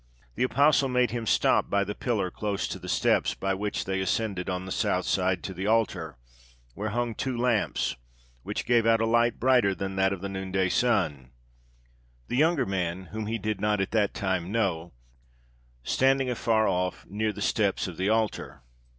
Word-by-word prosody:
The - - -6
apostle 140 +2 +3
made 125 -2 +2
him 115 -1 -4
stop - - +3
by 100 0 +2
the 100 +1 -4
pillar 105 -6 -1
close 100 -2 -2
to - - -5
the - - -8
steps - - +2
by 95 0 -1
which 100 +2 -3
they 95 0 -1
ascend 100 +1 -1
on 90 0 -3
the 95 - -7
south 90 0 0
side 90 -2 0
to 95 - -5
the 95 +2 -4
altar, 95 - 0 0.6
where 105 - -3
hung 120 +1 -1
two 130 +2 -3
lamps, 120 - 0 0.4
which - - -4
gave 120 -2 +3
out 115 0 +4
a 115 - +1
light 120 +1 +2
brighter 125 -6 +3
than 95 0 -4
that 95 0 +3
of 95 -2 -4
the 100 - -3
noonday 95 -1 -1
sun; 85 - +1 1.0
the - - -1
younger 155 -1 +3
man, 95 -2 -3
whom 110 -1 -4
he 115 +1 -1
did 105 -2 -3
not 105 -1 +1
at 95 - -1
that 105 -2 +1
time 95 -2 -2
know, 90 -7 -1 0.9
standing 135 - +2
afar 110 -2 +1
off, 90 0 -1
near 110 +2 -1
the - - -10
steps - - 0
of - - -8
the 95 +2 0
altar. 110 - -1
105 Hz, 185 wpm, -27 LUFS, 95-115 Hz, 1.0 s, out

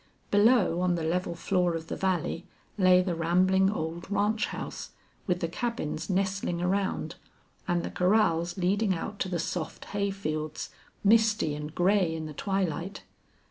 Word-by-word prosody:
Below, 205 -4 +4
on 180 -1 +2
the 165 - -3
level 170 +2 -1
floor 180 -1 +1
of 165 -1 -4
the - - -4
valley, 175 -2 -1 0.3
lay 185 -2 +5
the 180 -1 -1
rambling 185 +3 +3
old 170 -2 -4
ranch 205 +2 +1
house, - - -6 0.3
with 180 -2 0
the 170 - 0
cabins 170 -4 -3
nestling 190 -2 0
around, 190 +2 -1 0.5
and 175 -2 +1
the - - -4
corrals 180 -3 +2
leading 190 +2 +1
out 205 +5 -5
to 190 - -1
the 180 - -1
soft 165 0 -4
hay 200 0 0
fields, 155 -5 -4 0.3
misty 215 -6 +4
and 150 +1 -6
gray 180 -2 +2
in 160 -1 -4
the 155 - -7
twilight. 190 +1 -2
180 Hz, 155 wpm, -28 LUFS, 170-200 Hz, 0.5 s, lay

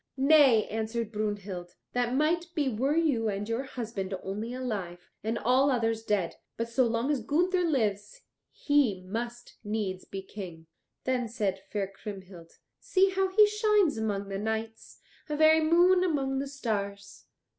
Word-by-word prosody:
"Nay," 270 -5 +6
answered 225 0 -3
Brunhild, 205 -4 -4 0.2
"that 245 0 0
might 330 +4 +1
be 295 -3 +1
were 260 +6 0
you 280 -10 +2
and 205 +1 -3
your 230 +2 -1
husband 215 -7 -4
only 210 +5 -4
alive, 205 -9 -5
and 225 +2 -1
all 255 +5 +3
others 225 -3 0
dead, 205 -6 -1 0.2
but 230 - -2
so 240 +1 +2
long 230 +5 0
as 280 -5 0
Gunther 355 - +1
lives 210 - -1 0.3
he 260 -11 +1
must 235 +5 -6
needs 205 -3 -3
be 195 0 -7
King." 180 -5 -9 0.4
Then 255 -2 0
said 205 -4 -2
fair 205 -2 -1
Kriemhild, 190 -3 -10 0.3
"See 380 0 +2
how 385 0 +1
he 415 +3 +6
shines 420 -6 +2
among 205 -3 -2
the 195 0 -3
knights, 220 +1 -4 0.3
a 300 - -2
very 315 +1 +6
moon 350 +3 +5
among 275 -6 0
the 275 - -3
stars." 200 -7 -4
230 Hz, 155 wpm, -29 LUFS, 205-285 Hz, 0.4 s, Nay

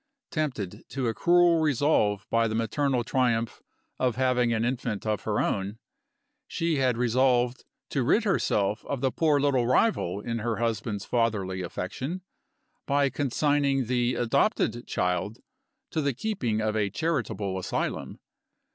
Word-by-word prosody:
Tempted 115 - -3
to 135 -2 -3
a 115 - 0
cruel 170 +7 +4
resolve 135 -9 +2
by 115 0 +3
the 110 - -2
maternal 125 +3 0
triumph 115 -2 0 0.4
of 125 -2 +1
having 125 -2 +2
an 115 0 +1
infant 120 -4 -2
of 110 -1 -1
her 105 -1 0
own, 100 +2 -1 0.7
she 165 -3 -1
had 130 -3 +2
resolved 125 +1 +2 0.3
to 135 - 0
rid 155 - +3
herself 105 - +1
of 140 -3 -3
the 135 -1 +1
poor 150 -1 +2
little 135 -4 +2
rival 125 - +2
in 115 +2 -3
her 115 +1 -1
husband's 110 -3 -2
fatherly 105 -6 0
affection, 130 - -4 0.6
by 140 -1 +2
consigning 140 -1 +1
the 120 +1 +1
adopted 120 - +1
child 90 +4 -1 0.5
to 160 - 0
the 140 -3 0
keeping 125 - -1
of 110 0 0
a 105 -2 +1
charitable 105 - -2
asylum. 90 - -3
120 Hz, 140 wpm, -27 LUFS, 110-140 Hz, 0.7 s, cruel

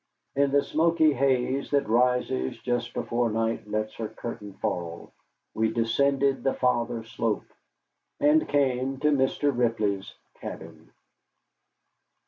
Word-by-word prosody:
In 140 0 +3
the 140 0 +4
smoky 160 0 +3
haze 135 0 +1
that 140 -1 +1
rises 120 - +1
just 120 -1 -2
before 120 0 0
night 115 0 -1
lets 110 +1 -2
her 110 - -3
curtain 105 -3 -7
fall, 85 -3 -4 0.4
we 110 0 +1
descended 135 +4 +1
the 135 - +1
farther 120 -2 0
slope, 115 -1 -3 0.7
and 150 +2 +3
came 135 -2 +1
to 150 0 +3
Mr. 140 0 +1
Ripley's 110 -5 0 0.3
cabin. - - -9
125 Hz, 115 wpm, -27 LUFS, 110-140 Hz, 0.7 s, the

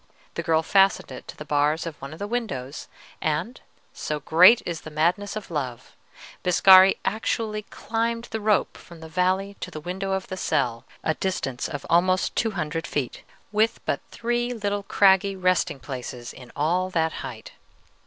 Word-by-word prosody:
The - - -3
girl 160 -1 +2
fastened 195 +2 +3
it - - -9
to - - -9
the 150 - -8
bars 150 +2 +1
of 165 -2 -5
one 140 +1 -7
of 155 - -9
the 200 - -4
windows, 205 - -4 0.3
and 160 - -2 0.3
so 150 0 -3
great 180 - +6
is 170 -2 -4
the - - -9
madness 175 +7 0
of 210 -4 -7
love 130 -6 -5 0.5
Biscari 185 +1 +7
actually 215 +1 -1
climbed 230 +1 -2
the 220 - -3
rope 210 -1 +1
from 170 -2 -14
the 160 - -8
valley 185 +4 0
to - - -5
the 155 - -7
window 190 +4 -3
of 190 0 -2
the 185 - -6
cell, 120 -7 -1 0.2
a 160 - +1
distance 145 -9 -3
of 145 -3 -6
almost 185 +2 +2
two 225 - +1
hundred 155 0 -3
feet, 135 -5 -3 0.3
with 215 +2 +2
but - - 0
three 240 +1 -2
little 205 -2 -2
craggy 195 0 +3
resting 185 -6 +1
places 125 -1 -7
in 125 -2 -13
all 175 +5 +1
that 160 -3 0
height. - - -8
180 Hz, 175 wpm, -25 LUFS, 155-200 Hz, 0.5 s, Biscari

